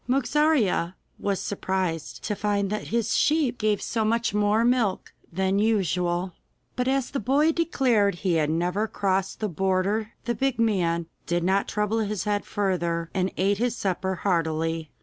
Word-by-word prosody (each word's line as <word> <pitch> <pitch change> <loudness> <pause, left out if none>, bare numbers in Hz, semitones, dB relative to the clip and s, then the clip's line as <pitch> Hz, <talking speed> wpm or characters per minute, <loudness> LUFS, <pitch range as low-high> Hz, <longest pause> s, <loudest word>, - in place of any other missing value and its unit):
Mogarzea 260 - +2 0.2
was 200 -2 -1
surprised 185 -5 -3
to 210 - -2
find 200 -1 0
that 210 - -3
his 230 -1 0
sheep 295 -6 +2
gave 210 -1 +1
so 225 -2 -1
much 230 0 +1
more 210 +2 +2
milk 240 -6 +1 0.2
than 190 +3 +1
usual, 180 -4 0 0.4
but 250 0 -1
as 270 -1 0
the 275 - -2
boy 280 +8 +3
declared 255 - +2
he 180 0 -1
had 155 -2 +2
never 180 +6 0
crossed 195 -1 -1
the 215 - +1
border 195 +4 0
the 240 - 0
big 265 +3 0
man 175 -7 +1 0.2
did 175 0 0
not 190 +2 +1
trouble 210 +2 0
his 210 -3 -2
head 205 -1 -1
further, 170 -4 -1
and 190 -1 0
ate 195 +2 +1
his 245 0 0
supper 190 0 -1
heartily. 165 -3 0
200 Hz, 160 wpm, -25 LUFS, 180-225 Hz, 0.4 s, boy